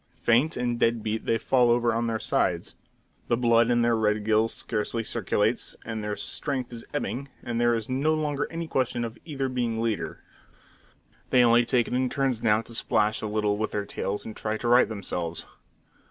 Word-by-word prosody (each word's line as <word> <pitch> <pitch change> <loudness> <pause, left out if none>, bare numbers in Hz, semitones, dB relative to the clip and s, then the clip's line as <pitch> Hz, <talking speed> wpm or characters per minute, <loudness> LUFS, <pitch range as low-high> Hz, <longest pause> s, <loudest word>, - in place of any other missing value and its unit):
Faint 125 +8 +3
and 120 -1 -1
dead 115 -2 +2
beat, 110 +1 -3
they 115 - +3
fall 125 +1 +3
over 120 0 +3
on 115 +1 0
their 115 -1 0
sides. - - 0 0.5
The 120 - +2
blood 115 -1 +4
in 120 -1 +3
their 120 0 +3
red 105 -1 +1
gills 110 +1 +3
scarcely 115 +1 -2
circulates, 110 +1 0
their 105 -2 -3
strength 130 -1 -3
is 115 - -7
ebbing, 140 -2 -3 0.2
and 120 -1 -2
there 120 0 +4
is 115 -2 -3
no 140 +5 +1
longer 150 -2 -1
any 165 0 -4
question 125 -4 0
of 115 0 -8
either 140 -4 -2
being 120 -3 -1
leader. 115 -2 -2 1.1
They 125 - +5
only 120 0 +5
take 120 -3 +2
it - - -5
in 130 0 +1
turns 135 -4 0
now 110 -1 +3
to 115 - -8
splash 110 -2 +1
a 110 - -2
little 105 -1 0
with 110 - 0
their 100 -1 -3
tails 100 0 -3
and 110 - -7
try 110 0 -2
to 120 - -4
right 120 0 +5
themselves. 90 -6 -4
115 Hz, 195 wpm, -26 LUFS, 110-125 Hz, 1.1 s, They